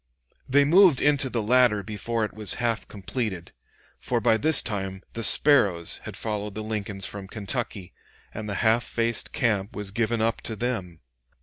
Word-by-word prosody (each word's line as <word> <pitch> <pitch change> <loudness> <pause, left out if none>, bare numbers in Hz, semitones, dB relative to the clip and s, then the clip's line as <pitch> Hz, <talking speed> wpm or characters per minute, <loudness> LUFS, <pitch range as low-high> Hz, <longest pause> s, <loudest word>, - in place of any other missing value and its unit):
They 140 +2 +4
moved 175 -2 +6
into 145 -2 +3
the 115 -3 -2
latter 120 -2 +3
before 110 +2 -2
it - - -8
was 105 -1 +2
half 120 -2 -2
completed; 100 -3 -5 0.5
for - - -1
by 110 - +3
this 155 +3 +4
time 95 -3 -4
the 115 - -5
Sparrows 100 - +3
had - - -7
followed 105 -2 -4
the 110 - -4
Lincolns 105 -2 -4
from 100 -2 -7
Kentucky, 100 -3 -4 0.4
and 105 -1 -6
the 100 - -3
half 115 +2 +3
faced 115 -1 -2
camp 105 -3 -1
was 105 -2 -5
given 115 +2 -1
up 115 +1 0
to 110 - -4
them. 100 -8 -4
110 Hz, 170 wpm, -25 LUFS, 100-120 Hz, 0.5 s, moved